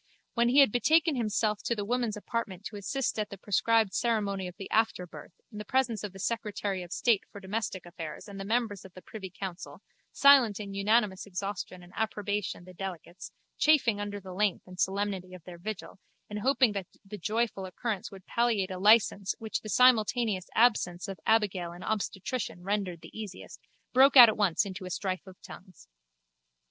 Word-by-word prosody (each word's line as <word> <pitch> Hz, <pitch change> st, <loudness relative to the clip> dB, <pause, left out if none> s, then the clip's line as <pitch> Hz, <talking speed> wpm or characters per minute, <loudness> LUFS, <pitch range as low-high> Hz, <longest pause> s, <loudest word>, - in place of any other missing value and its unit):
When 235 Hz, 0 st, +2 dB
he 275 Hz, +3 st, +6 dB
had 270 Hz, -, +5 dB
betaken 310 Hz, +7 st, +3 dB
himself 215 Hz, -2 st, 0 dB
to 235 Hz, -, -1 dB
the 205 Hz, -2 st, -3 dB
women's 240 Hz, -1 st, -1 dB
apartment 210 Hz, -3 st, -4 dB
to 215 Hz, -, -6 dB
assist 220 Hz, +5 st, -2 dB
at 210 Hz, -, -2 dB
the 200 Hz, -, -8 dB
prescribed 215 Hz, +2 st, +2 dB
ceremony 205 Hz, -5 st, 0 dB
of 180 Hz, -, -9 dB
the 195 Hz, -, -7 dB
afterbirth 185 Hz, -6 st, -1 dB, 0.2 s
in 210 Hz, -, -8 dB
the -, -, -5 dB
presence 240 Hz, -1 st, 0 dB
of 205 Hz, -, -4 dB
the 195 Hz, -, -12 dB
secretary 205 Hz, -2 st, -2 dB
of 175 Hz, -1 st, -10 dB
state 225 Hz, -2 st, +2 dB
for 205 Hz, -, -9 dB
domestic 195 Hz, -1 st, -4 dB
affairs 170 Hz, -1 st, -8 dB
and 200 Hz, -1 st, -9 dB
the -, -, -4 dB
members 220 Hz, -1 st, -1 dB
of 190 Hz, -, -14 dB
the 185 Hz, -, -12 dB
privy 200 Hz, -4 st, -8 dB
council, 185 Hz, 0 st, -8 dB, 0.3 s
silent 265 Hz, -8 st, +6 dB
in 200 Hz, -2 st, -6 dB
unanimous 205 Hz, -1 st, +1 dB
exhaustion 195 Hz, -1 st, -5 dB
and 175 Hz, +1 st, -16 dB
approbation 210 Hz, -4 st, -2 dB
the 185 Hz, +1 st, -13 dB
delegates, 180 Hz, -1 st, -7 dB, 0.3 s
chafing 260 Hz, -9 st, +4 dB
under 205 Hz, 0 st, -4 dB
the 190 Hz, -1 st, -10 dB
length 200 Hz, 0 st, 0 dB
and 180 Hz, 0 st, -13 dB
solemnity 190 Hz, -2 st, -1 dB
of 180 Hz, -, -13 dB
their 175 Hz, -1 st, -11 dB
vigil 200 Hz, 0 st, -7 dB, 0.3 s
and 210 Hz, -, -3 dB
hoping 260 Hz, 0 st, +3 dB
that 195 Hz, -3 st, -4 dB, 0.2 s
the 205 Hz, +1 st, -8 dB
joyful 215 Hz, -1 st, -1 dB
occurrence 205 Hz, +1 st, -4 dB
would 195 Hz, -3 st, -13 dB
palliate 225 Hz, -5 st, 0 dB
a 185 Hz, -, -5 dB
licence 205 Hz, -1 st, +4 dB
which 220 Hz, -1 st, -4 dB
the 215 Hz, -, -8 dB
simultaneous 225 Hz, -4 st, +3 dB
absence 210 Hz, -6 st, +2 dB
of 195 Hz, -3 st, -7 dB
abigail 200 Hz, -6 st, +2 dB
and 175 Hz, -, -10 dB
obstetrician 205 Hz, -3 st, -3 dB
rendered 195 Hz, -4 st, -2 dB
the -, -, -13 dB
easier, 210 Hz, -4 st, -7 dB, 0.5 s
broke 270 Hz, +2 st, +6 dB
out 240 Hz, -3 st, +12 dB
at 220 Hz, -, -1 dB
once 205 Hz, -1 st, +2 dB
into 190 Hz, 0 st, -7 dB
a -, -, -6 dB
strife 185 Hz, +1 st, -3 dB
of 185 Hz, -1 st, -13 dB
tongues. 185 Hz, -3 st, -13 dB
205 Hz, 185 wpm, -29 LUFS, 190-225 Hz, 0.5 s, out